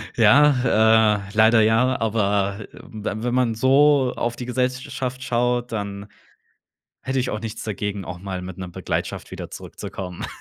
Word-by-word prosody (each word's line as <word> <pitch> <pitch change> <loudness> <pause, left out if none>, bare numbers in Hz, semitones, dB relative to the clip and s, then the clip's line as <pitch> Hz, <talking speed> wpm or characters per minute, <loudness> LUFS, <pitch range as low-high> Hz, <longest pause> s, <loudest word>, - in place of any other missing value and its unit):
Ja, 110 -3 +5
äh, - - -11
leider 110 +1 +5
ja, 115 +4 +2
aber, 100 -2 0
äh, - - -9 0.2
we 110 0 -5
wenn 120 0 -1
man 125 -3 +1
so 135 +2 +4
auf 120 0 -2
die 125 - -6
Gesellsch 125 +1 -2
schaft 130 0 -4
schaut, 120 0 0
dann 100 -2 -5 1.0
hätte 135 0 -2
ich 125 - -1
auch 105 - -4
nichts 115 -1 -6
dagegen, 105 -2 -4
auch 90 +1 -7
mal 95 -1 -5
mit 90 0 -8
'ner 95 -1 -6
Begleitung 90 - -4
wieder - - -8
zurückzukommen. 90 -2 -7
110 Hz, 160 wpm, -22 LUFS, 105-125 Hz, 1.0 s, Ja